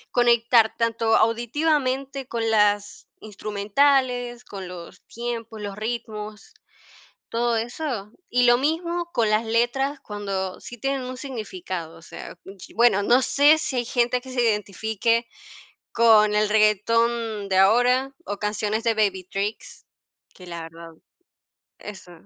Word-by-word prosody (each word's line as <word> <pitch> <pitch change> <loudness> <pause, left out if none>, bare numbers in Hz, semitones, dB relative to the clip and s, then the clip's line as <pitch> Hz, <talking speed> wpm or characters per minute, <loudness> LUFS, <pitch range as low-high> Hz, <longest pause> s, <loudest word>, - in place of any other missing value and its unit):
conectar 235 -2 +4
tanto 230 -1 +2
auditivamente 270 +3 0
con 230 -2 -2
las 205 -2 +1
instrumentales, 240 +4 0
con 195 -2 -8
los 180 +1 -10
tiempos, 230 -2 -6
los 200 -1 -5
ritmos, 215 -1 -6 0.7
todo 235 0 0
eso. 235 -3 -4 0.2
Y 250 0 +2
lo 240 0 +6
mismo 340 +4 -1
con 225 -7 +1
las 215 +2 +1
letras, 240 +5 0
cuando 195 -4 -5
sí 240 - -10
tienen 270 +3 -2
un 255 0 -6
significado. 185 - -6
O 165 - -16
sea 170 - -10
mm, 195 - -11
chi 190 - -13
bueno, 230 -4 +4
no 245 +5 +4
sé 290 +4 +4
si 305 -4 -4
hay 245 - 0
gente 245 +1 0
que 260 0 -11
se 250 - 0
identifique 220 +2 0 0.7
con 215 -2 +5
el 210 0 +2
reguetón 220 0 +1
de 190 - +2
ahora 245 +7 +3
o 205 - -5
canciones 210 +1 -2
de 230 -1 +1
Baby 200 -4 0
Tricks, 200 +4 -5 0.5
que 180 - -14
la 170 -1 -6
verdad 165 0 -11 0.9
eso, 190 -3 -10
225 Hz, 140 wpm, -24 LUFS, 205-245 Hz, 0.9 s, lo